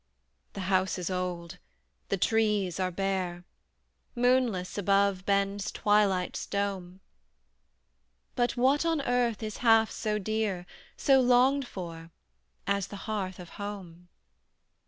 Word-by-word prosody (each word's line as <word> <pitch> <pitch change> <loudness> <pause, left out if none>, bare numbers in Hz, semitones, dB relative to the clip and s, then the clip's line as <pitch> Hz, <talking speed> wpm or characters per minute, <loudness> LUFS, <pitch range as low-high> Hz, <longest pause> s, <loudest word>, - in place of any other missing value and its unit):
The 195 - -5
house 185 0 +1
is 180 0 -3
old, 180 -2 -4 0.5
the 195 - +1
trees 210 -3 +1
are 185 -1 +1
bare, 185 -1 -2 0.7
Moonless 245 -7 +1
above 200 -1 +1
bends 200 0 0
twilight's 205 -3 +1
dome; 195 -2 -3 1.3
But 245 -1 0
what 265 +5 +3
on 325 -3 +1
earth 245 -4 0
is 215 -1 -4
half 225 -2 +4
so 215 -2 -2
dear 210 -3 -2 0.3
So 270 -1 +4
longed 255 +2 +4
for 165 -5 -8 0.6
as 200 -1 0
the 205 - -9
hearth 195 -4 -3
of 175 -2 -10
home? 180 -4 -8
200 Hz, 115 wpm, -29 LUFS, 185-225 Hz, 1.3 s, half